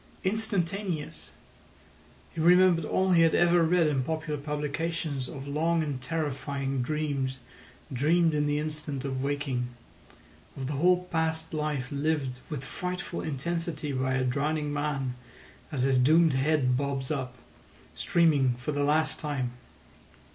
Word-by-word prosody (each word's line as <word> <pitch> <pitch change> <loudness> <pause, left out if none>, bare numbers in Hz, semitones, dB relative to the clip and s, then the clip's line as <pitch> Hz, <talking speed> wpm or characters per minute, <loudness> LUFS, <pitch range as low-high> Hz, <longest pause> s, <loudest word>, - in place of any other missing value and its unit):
Instantaneous! 195 -5 -1 1.0
He 165 - -3
remembered 175 -1 +5
all 190 +4 +1
he 170 -2 +6
had 165 -1 +4
ever 175 0 +4
read 165 +1 +3
in 145 -3 +1
popular 155 +1 -3
publications 150 -1 -2
of 140 -2 -7
long 160 +3 +1
and 140 -4 -4
terrifying 140 -3 -2
dreams 140 -1 -1 0.6
dreamed 160 +5 +3
in 150 0 +1
the 145 0 +1
instant 150 -3 -4
of 130 -1 -2
waking; 140 -3 -1 0.9
of 135 - -4
the 145 - -3
whole 180 +5 +3
past 160 -1 -1
life 150 -5 -2
lived 140 -3 -1
with 145 -4 -4
frightful 180 +6 -4
intensity 155 +1 -3
by 130 0 0
a 130 - +1
drowning 145 +3 -1
man 145 -3 -1 0.6
as 135 -4 -1
his 135 -1 +3
doomed 160 +4 +5
head 135 -2 +2
bobs 135 0 -2
up, 130 -4 -3 0.6
streaming, 150 -7 +3
for 125 +5 -4
the 145 -1 0
last 155 +2 +2
time. 140 -5 -2
150 Hz, 135 wpm, -28 LUFS, 135-165 Hz, 1.0 s, he